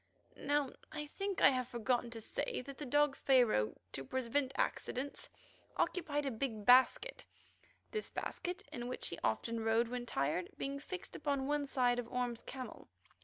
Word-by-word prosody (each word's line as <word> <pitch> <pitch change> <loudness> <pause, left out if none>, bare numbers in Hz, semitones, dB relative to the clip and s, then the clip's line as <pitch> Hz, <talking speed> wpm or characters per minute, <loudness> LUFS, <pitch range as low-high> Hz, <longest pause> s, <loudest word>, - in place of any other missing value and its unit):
Now 285 -1 0 0.2
I 300 -1 -4
think 390 +6 -3
I - - +9
have 255 -2 0
forgotten 240 0 0
to 230 -1 -7
say 235 - -2
that 275 -1 -8
the 295 - -4
dog 290 +1 +4
Pharaoh, 240 - +4 0.2
to 135 - -4
prevent 260 - 0
accidents, 270 +3 -1 0.5
occupied 295 -5 0
a 270 - 0
big 220 -3 -3
basket; 260 - +5 0.7
this 430 -1 -3
basket, 365 +3 -4
in 240 -1 -4
which 255 - -2
he 170 - -5
often 230 - 0
rode 225 +1 +3
when 245 0 -4
tired, 150 +4 0
being 275 +1 -2
fixed 365 +5 -6
upon 280 -2 0
one 290 0 0
side 245 -2 +2
of 235 -1 -5
Orme's 245 -2 -1
camel. 260 -1 -7
255 Hz, 165 wpm, -36 LUFS, 235-290 Hz, 0.7 s, I